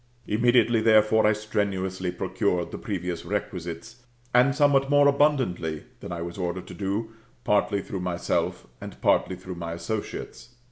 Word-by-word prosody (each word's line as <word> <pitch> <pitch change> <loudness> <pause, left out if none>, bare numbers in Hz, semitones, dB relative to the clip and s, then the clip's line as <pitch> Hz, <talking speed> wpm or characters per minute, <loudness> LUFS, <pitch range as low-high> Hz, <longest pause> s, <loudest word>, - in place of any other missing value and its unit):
Immediately, 120 +1 +3
therefore, 110 0 +5
I 105 - +4
strenuously 95 -3 -2
procured 90 -1 -1
the - - -6
previous 90 -6 -4
requisites, 100 +1 -5 0.4
and 125 +2 +5
somewhat 140 -2 +3
more 145 0 +5
abundantly 130 - +1 0.2
than - - -8
I 85 -1 -4
was 85 +2 -7
ordered 90 0 -3
to - - -8
do, 105 +3 -3 0.3
partly 100 -1 +1
through 95 - -5
myself, 90 -1 -1 0.2
and - - -9
partly 95 - +2
through 95 0 -8
my 85 -1 -4
associates. 110 +5 -6
100 Hz, 145 wpm, -26 LUFS, 90-115 Hz, 0.4 s, therefore